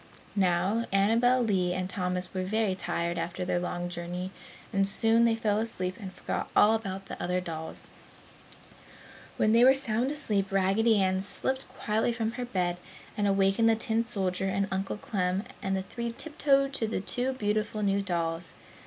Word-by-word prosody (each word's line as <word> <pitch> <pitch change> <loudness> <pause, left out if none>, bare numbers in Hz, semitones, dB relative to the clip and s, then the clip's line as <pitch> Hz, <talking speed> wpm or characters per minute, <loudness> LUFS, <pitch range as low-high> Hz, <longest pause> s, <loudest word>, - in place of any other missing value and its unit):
Now, 195 +4 +1
Annabel 230 +6 +4
Lee 185 -5 +1
and 185 0 -2
Thomas 180 -1 -2
were 185 - -1
very 205 +1 0
tired 170 -2 -2
after 175 +2 -3
their 180 -1 0
long 175 0 -3
journey 175 +1 -5 0.4
and 195 -1 +2
soon 225 +3 +3
they 230 -1 +3
fell 215 -2 +1
asleep 185 -5 -2
and 195 -3 -7
forgot - - -4
all 210 +1 +6
about 195 -3 -3
the - - -7
other 180 +1 0
dolls. 160 -3 -6 1.5
When 215 - +3
they 230 +2 +6
were 265 +1 +7
sound 245 -1 0
asleep, 210 -10 -1
Raggedy 200 +3 +3
Ann 190 0 +2
slipped 260 +6 -2
quietly 235 -2 0
from 225 -1 -1
her 245 +1 -4
bed 180 -6 -1 0.4
and 205 -1 +1
awakened 195 +3 +3
the 225 - +4
tin 225 0 0
soldier 190 -4 -1
and 195 +1 0
Uncle 190 +2 -2
Clem 190 -2 -1 0.2
and 195 0 0
the 190 - -2
three 235 +4 -4
tiptoed 275 0 +1
to 225 -4 -1
the 220 - -2
two 250 +6 -1
beautiful 215 -2 -1
new 200 0 +2
dolls. 170 -2 -2
195 Hz, 170 wpm, -29 LUFS, 185-225 Hz, 1.5 s, were